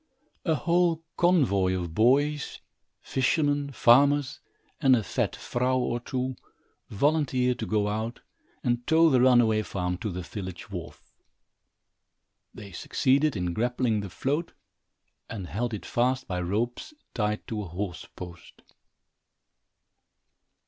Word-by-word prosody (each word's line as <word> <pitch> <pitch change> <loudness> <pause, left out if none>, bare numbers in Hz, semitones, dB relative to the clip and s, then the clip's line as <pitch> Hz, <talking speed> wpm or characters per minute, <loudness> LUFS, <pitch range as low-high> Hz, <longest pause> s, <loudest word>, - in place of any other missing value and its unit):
A 160 -3 +2
whole 170 +3 +1
convoy 110 - +3
of 85 -2 -5
boys, 140 - +2 0.4
fishermen, 145 +1 0
farmers, 140 +3 +4 0.4
and 130 -1 +6
a 115 - 0
fat - - -1
vrouw 125 +1 -1
or 120 -1 -1
two, 130 +1 -3 0.5
volunteered 125 -1 +1
to - - -3
go 105 -1 +1
out 110 +3 -3 0.4
and 120 0 -1
tow 160 0 +5
the 130 -2 +4
runaway 120 -4 +5
farm 90 -3 -3
to 110 - -3
the 90 -1 -5
village 95 -2 -7
wharf. - - -9 1.4
They 100 -1 -11
succeeded 135 - +1
in 90 -3 -2
grappling 120 0 0
the 100 -1 -5
float 145 - -2 0.8
and 100 -5 -5
held 110 +9 -3
it 105 - -6
fast 130 +2 0
by 90 -2 -2
ropes 115 - -2 0.2
tied 105 -2 -1
to 110 -2 -3
a 100 - -6
horse 90 -1 -5
post. 90 -1 -11
120 Hz, 125 wpm, -27 LUFS, 100-135 Hz, 1.4 s, and